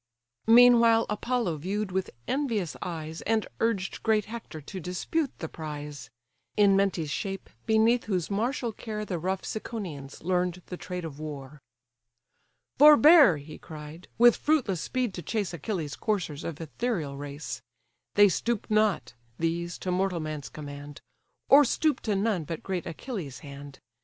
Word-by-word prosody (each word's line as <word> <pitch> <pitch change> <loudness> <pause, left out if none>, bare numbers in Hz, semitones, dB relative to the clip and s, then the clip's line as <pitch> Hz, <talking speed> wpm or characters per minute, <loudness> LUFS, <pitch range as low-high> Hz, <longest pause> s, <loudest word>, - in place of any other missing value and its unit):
Meanwhile 230 -1 +7
Apollo 210 -5 -1
view'd 195 +5 -3
with 190 0 -1 0.2
envious 230 - -1
eyes, 160 -2 -5
And 220 -1 +1
urged 220 -5 -1
great 215 -2 +2
Hector 220 -7 -8
to 185 +6 -8
dispute 185 - -2
the 160 - -5
prize; 150 -4 -7 0.5
(In 200 -2 +6
Mentes' 185 -6 +1
shape, 195 +3 -4 0.2
beneath 225 +2 +3
whose 185 -3 -1
martial 235 +3 -1
care 215 -1 -5
The 180 -4 -3
rough 190 +3 -2
Ciconians 175 - -6
learn'd 180 0 0
the 180 - -6
trade 180 -1 -6
of 150 -2 -8
war;) 150 -2 -7 1.2
"Forbear 295 - +8
(he 145 +2 -10
cried) 155 +2 -10
with 240 0 +6
fruitless 255 - +1
speed 250 -5 -1
to 175 - -6
chase 205 -2 -2
Achilles' 165 -3 -3
coursers, 180 -9 -2
of 160 -3 -5
ethereal 165 - -3
race; 145 +2 -6 0.5
They 205 0 +8
stoop 230 +4 -1
not, 215 - +2 0.2
these, 170 +1 -2
to 185 - -3
mortal 185 -1 0
man's 155 -2 -5
command, 145 -1 -9 0.5
Or 285 +2 +8
stoop 305 +3 +1
to 210 -3 -1
none 195 -5 0
but 165 +1 -5
great 185 -3 -3
Achilles' 170 - -6
hand. 140 0 -10
185 Hz, 145 wpm, -28 LUFS, 155-220 Hz, 1.2 s, Forbear